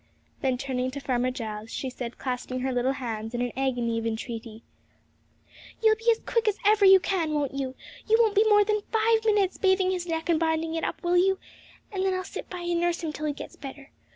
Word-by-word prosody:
Then 260 -2 +1
turning 255 -1 -2
to 275 +2 -6
Farmer 255 -2 0
Giles, 220 -4 -6
she 265 - -4
said, 245 -1 -6
clasping 255 0 -3
her 265 +1 -1
little 250 +2 +1
hands 225 -3 -5
in 245 0 -1
agony 245 -3 0
of 225 - -3
entreaty, 225 0 -5 1.2
'You'll 440 -1 +5
be 455 +2 0
as 455 -1 +4
quick 465 -1 0
as 420 -1 +2
ever 415 -1 +5
you 385 0 +9
can, 335 -3 -1
won't 285 -3 -1
you? 265 -1 -3 0.3
You 445 - +6
won't 445 -3 +4
be 420 +1 +5
more 415 -1 +6
than 425 0 +1
five 445 0 +3
minutes 410 -4 +2
bathing 380 -1 +3
his 360 -1 -3
neck 325 -1 -2
and 335 -2 +3
binding 320 0 0
it 325 - -2
up, - - -3
will 350 0 +3
you? 385 +2 +3 0.5
and 385 -2 -2
then 380 -1 +1
I'll 370 - -2
sit 390 - -8
by 360 -1 -6
and 345 -1 0
nurse 345 0 0
him 310 -2 -2
till 305 0 -3
he 295 - 0
gets - - -9
better. 275 0 -10
320 Hz, 225 wpm, -27 LUFS, 255-385 Hz, 1.2 s, you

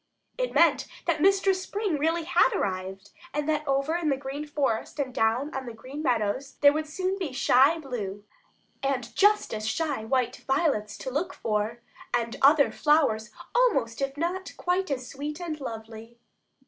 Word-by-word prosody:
It - - -2
meant - - +4 0.2
that 320 -3 0
Mistress 390 0 +3
Spring 395 -5 -2
really 325 +3 +1
had 335 -5 +3
arrived, 190 +1 -3 0.2
and 295 0 -1
that 305 -1 0
over 275 +4 +1
in 340 -3 0
the 275 - +1
Green 280 +2 -6
Forest 280 -6 -1
and 270 -3 -2
down 240 +5 +1
on 265 -1 -4
the 235 - -7
Green 265 +6 -8
Meadows 250 0 -1
there 285 0 +7
would 310 +1 -2
soon 370 +5 -2
be 345 -7 -3
shy 270 +4 +4
blue, 210 -9 -5 0.6
and 265 -3 -2
just 415 - +3
as 215 0 -3
shy 285 -1 -1
white 250 +1 0
violets 265 -7 +1
to 260 - -5
look 325 +8 -2
for, 215 +2 -2 0.3
and 235 -1 -1
other 285 +1 +6
flowers 275 -8 +2 0.2
almost 275 - +2
if 275 +1 -2
not 360 +4 -3
quite 365 +1 0
as 255 -3 -3
sweet 295 +3 -5
and 320 -4 -5
lovely. 225 -1 -8
275 Hz, 170 wpm, -27 LUFS, 235-320 Hz, 0.6 s, there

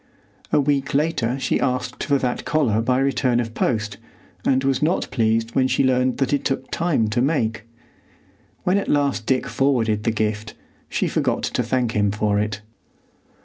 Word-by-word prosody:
A - - +4
week 140 -1 0
later 140 -5 +1
she 135 - 0
asked 125 -1 -2
for 140 - +2
that 125 -2 -2
collar 125 -9 +1
by 125 +2 +1
return 135 -2 +1
of 115 -2 -3
post, 105 -4 -1 0.5
and 130 0 +2
was 135 -1 +1
not 160 +4 +1
pleased 115 -1 +1
when 130 -1 +3
she 130 - +1
learned 130 -1 +2
that 135 0 0
it 145 - +1
took 135 -1 -2
time 165 -10 +1
to 120 +2 +1
make. 115 -6 0 1.0
When 185 +3 +2
at - - -4
last 140 -6 +1
Dick 130 -1 +1
forwarded 115 -6 +1
the - - +1
gift, 110 -1 -2 0.3
she - - 0
forgot - - 0
to - - 0
thank 120 0 0
him 105 -2 +1
for 105 0 0
it. 105 -1 -2
125 Hz, 175 wpm, -22 LUFS, 110-135 Hz, 1.0 s, A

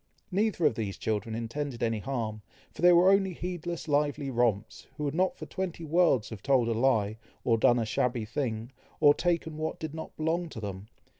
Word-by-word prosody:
Neither 200 -3 +1
of - - +4
these 105 -3 -4
children 110 +1 -2
intended 120 +3 -4
any 115 -2 0
harm, 110 -3 -3 0.3
for - - -10
they 180 0 +7
were 175 +2 +6
only 195 -1 +3
heedless 175 -1 -5
lively 145 -1 0
romps, 115 -3 0
who 150 - -4
would 145 -1 -1
not 185 +3 +1
for - - -7
twenty 180 -3 -4
worlds 150 -9 +3
have 110 -4 -8
told 130 -4 +3
a - - +1
lie, 110 -3 +2 0.3
or 115 - +3
done 120 +2 +4
a 115 - 0
shabby 120 +1 0
thing, 115 -1 -3 0.3
or 145 -2 +7
taken 165 -1 -1
what 155 0 -3
did 160 -2 -5
not 160 0 -8
belong 165 +2 -1
to 115 - -8
them. 100 -1 -6
135 Hz, 200 wpm, -29 LUFS, 115-165 Hz, 0.3 s, they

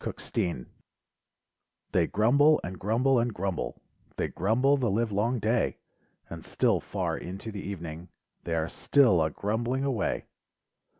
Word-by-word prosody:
GRUMBLERS - - -6 1.6
They - - +2
grumble 140 +9 +4
and 90 +1 -6
grumble 120 +6 +2
and 120 +1 0
grumble; 95 -3 -4 0.3
They - - -1
grumble 120 +9 +2
the 130 -5 0
live 110 +3 0
long 110 +5 +1
day, 115 +2 0 0.5
And - - -8
.still - - +1
far - - -3
into 95 +5 -7
the 100 -2 -6
evening 85 -3 -7 0.3
They 85 - -2
are 80 0 0
still 120 - +3
a 80 - +2
grumbling 115 - -2
away. 125 -9 -1
110 Hz, 135 wpm, -28 LUFS, 95-125 Hz, 1.6 s, grumble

